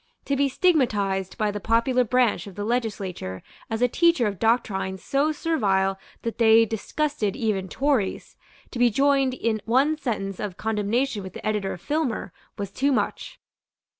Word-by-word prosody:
To 280 Hz, -, 0 dB
be 280 Hz, 0 st, +2 dB
stigmatized 210 Hz, -, +1 dB
by 215 Hz, -2 st, +1 dB
the 205 Hz, -, -4 dB
popular 235 Hz, +4 st, +2 dB
branch 245 Hz, -2 st, +1 dB
of 195 Hz, -, -10 dB
the 205 Hz, -, -4 dB
legislature 200 Hz, -, -3 dB, 0.3 s
as 225 Hz, +1 st, -1 dB
a -, -, +5 dB
teacher 335 Hz, -1 st, +3 dB
of 200 Hz, -4 st, -2 dB
doctrines 190 Hz, -5 st, 0 dB
so 285 Hz, +3 st, +1 dB
servile 195 Hz, -, 0 dB, 0.2 s
that 230 Hz, +1 st, -4 dB
they 225 Hz, 0 st, +6 dB
disgusted 225 Hz, +1 st, -2 dB
even 210 Hz, -7 st, -1 dB
Tories, 270 Hz, -7 st, -1 dB, 0.4 s
to 245 Hz, -, -5 dB
be 245 Hz, 0 st, +5 dB
joined 275 Hz, +2 st, +2 dB
in 225 Hz, -3 st, -1 dB
one 270 Hz, +7 st, +3 dB
sentence 195 Hz, -8 st, -3 dB
of 200 Hz, -4 st, -4 dB
condemnation 220 Hz, +2 st, -1 dB
with 190 Hz, -1 st, -8 dB
the -, -, -9 dB
editor 210 Hz, -2 st, -1 dB
of 175 Hz, -, -10 dB
Filmer, 295 Hz, -, -2 dB, 0.2 s
was 200 Hz, -2 st, -4 dB
too 275 Hz, +7 st, +1 dB
much. 260 Hz, -, -2 dB
225 Hz, 165 wpm, -25 LUFS, 200-265 Hz, 0.4 s, they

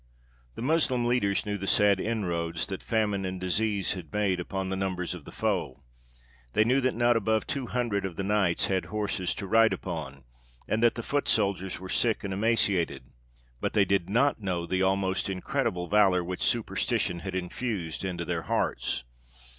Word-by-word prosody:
The -, -, -5 dB
Moslem 130 Hz, -4 st, +2 dB
leaders 120 Hz, -5 st, +1 dB
knew 105 Hz, -1 st, -2 dB
the 95 Hz, -, -4 dB
sad 100 Hz, -1 st, +4 dB
inroads 85 Hz, -7 st, -1 dB
that 95 Hz, -2 st, -5 dB
famine 105 Hz, -3 st, 0 dB
and 95 Hz, 0 st, -3 dB
disease 100 Hz, +2 st, 0 dB
had 90 Hz, -6 st, -8 dB
made 100 Hz, -3 st, +1 dB
upon 95 Hz, +1 st, -3 dB
the 95 Hz, -, -1 dB
numbers 95 Hz, -2 st, -2 dB
of 90 Hz, -5 st, -9 dB
the -, -, -10 dB
foe; 65 Hz, +1 st, -2 dB, 0.7 s
they 110 Hz, -, +5 dB
knew 125 Hz, +4 st, +3 dB
that 130 Hz, -1 st, +1 dB
not 120 Hz, +1 st, +3 dB
above 110 Hz, -1 st, +1 dB
two 135 Hz, -3 st, -3 dB
hundred 115 Hz, -6 st, -1 dB
of 95 Hz, -3 st, -4 dB
the 95 Hz, -, -3 dB
knights 95 Hz, -4 st, +2 dB
had 95 Hz, -2 st, 0 dB
horses 100 Hz, -4 st, -2 dB
to -, -, -5 dB
ride 115 Hz, +3 st, +4 dB
upon, 75 Hz, -7 st, -6 dB, 0.4 s
and 110 Hz, -, 0 dB
that 120 Hz, 0 st, +4 dB
the 115 Hz, -, -4 dB
foot 145 Hz, +4 st, -1 dB
soldiers 100 Hz, -4 st, 0 dB
were 95 Hz, -, -8 dB
sick 115 Hz, +4 st, +1 dB
and 100 Hz, -1 st, -3 dB
emaciated; 100 Hz, -4 st, +1 dB, 0.5 s
but -, -, -2 dB
they 100 Hz, -2 st, +4 dB
did 95 Hz, -2 st, +1 dB
not 120 Hz, +3 st, +2 dB
know 90 Hz, -4 st, -2 dB
the 95 Hz, +2 st, 0 dB
almost 95 Hz, 0 st, +1 dB
incredible 90 Hz, -1 st, -1 dB
valour 95 Hz, -3 st, +4 dB
which 90 Hz, +1 st, -5 dB
superstition 105 Hz, -3 st, 0 dB
had 95 Hz, +1 st, -5 dB
infused 95 Hz, -2 st, -3 dB
into 90 Hz, -2 st, -3 dB
their -, -, -2 dB
hearts. 60 Hz, -, -1 dB
95 Hz, 180 wpm, -28 LUFS, 90-110 Hz, 0.7 s, they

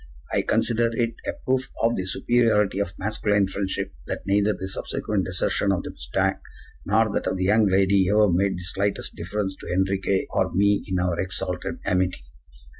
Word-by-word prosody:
I -, -, +3 dB
consider 115 Hz, 0 st, +1 dB
it 115 Hz, 0 st, 0 dB
a -, -, 0 dB
proof 130 Hz, 0 st, 0 dB
of 115 Hz, +1 st, +3 dB
the 95 Hz, -, -3 dB
superiority 105 Hz, -2 st, +2 dB
of 100 Hz, -3 st, -1 dB
masculine 105 Hz, 0 st, +1 dB
friendship 95 Hz, -2 st, -3 dB
that -, -, -4 dB
neither 100 Hz, +2 st, +2 dB
the 95 Hz, -, -4 dB
subsequent 100 Hz, +1 st, -2 dB
desertion 90 Hz, +2 st, +1 dB
of 95 Hz, -, 0 dB
the -, -, -6 dB
mustang -, -, -1 dB, 0.5 s
nor 110 Hz, -1 st, +3 dB
that -, -, -1 dB
of -, -, 0 dB
the 95 Hz, -, -1 dB
young 105 Hz, +3 st, +4 dB
lady 95 Hz, 0 st, +3 dB
ever 105 Hz, +1 st, +5 dB
made 95 Hz, +2 st, +1 dB
the 90 Hz, -, -7 dB
slightest 100 Hz, +3 st, -2 dB
difference 95 Hz, +3 st, -3 dB
to -, -, -10 dB
Enriquez 95 Hz, +1 st, +1 dB
or -, -, +1 dB
me 100 Hz, +1 st, +3 dB
in 95 Hz, -2 st, -1 dB
our 90 Hz, -1 st, 0 dB
exalted 95 Hz, -1 st, -3 dB
amity. 90 Hz, -5 st, 0 dB
100 Hz, 180 wpm, -24 LUFS, 95-105 Hz, 0.5 s, ever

